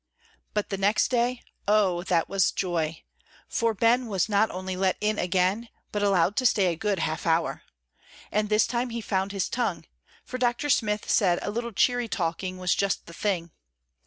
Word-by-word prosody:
But 210 0 -1
the 195 - -2
next 200 +2 +2
day, 245 0 0 0.2
oh, 200 -4 +3
that 170 -3 +1
was 195 -2 +2
joy! 165 -4 -2 0.4
for 230 -2 0
Ben 235 +4 +3
was 195 -4 0
not 210 +1 +2
only 185 0 -4
let 185 0 +1
in 210 0 0
again, 185 +5 +1 0.2
but 205 - -2
allowed 195 -1 +2
to 255 - +1
stay 190 -5 +2
a - - -6
good 205 +3 -1
half 160 -1 -2
hour. 165 0 +1 0.7
And 210 0 0
this 210 0 +4
time 245 +1 -2
he 235 0 -4
found 195 -2 -1
his 195 -2 -1
tongue, 230 -8 -2 0.4
for 255 - -6
Dr. 245 +4 +1
Smith 210 -3 +1
said 180 -5 +3
a - - -2
little 235 +2 -3
cheery 245 +3 +2
talking 185 -1 -2
was 180 -1 +1
just 200 -1 -1
the 170 - -12
thing. 170 -3 -2
200 Hz, 185 wpm, -26 LUFS, 185-225 Hz, 0.7 s, this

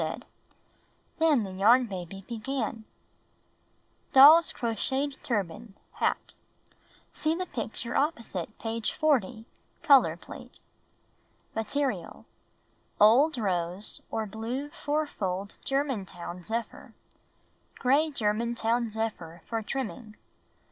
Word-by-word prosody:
And - - -3 1.0
then 310 -7 +4
the 195 - -6
Yarn 225 +7 +5
Baby 195 -2 -7
began: 230 -1 -4 1.3
Doll's 305 +5 +9
Crocheted 265 +5 -2
Turban 210 -1 -3 0.2
(Hat) - - -1 0.8
(See 310 +1 0
the 365 +2 -3
picture 235 -4 -5
opposite 230 - -2
page 225 0 -2
40 240 -8 +1 0.2
— - - -38
color 280 -5 +5
plate) - - -12 1.0
Material: 265 +5 -3 0.7
Old 260 +8 +6
rose 185 -2 -2
or 220 - -2
blue 230 +7 -5
four 300 +1 -1
fold 195 -6 -4
Germantown 195 -11 -3
zephyr. 230 +4 -5 0.8
Gray 280 +5 +3
Germantown 235 -1 0
zephyr 205 -7 -5
for 225 -1 -2
trimming. 225 -2 -5
230 Hz, 95 wpm, -28 LUFS, 210-275 Hz, 1.3 s, Doll's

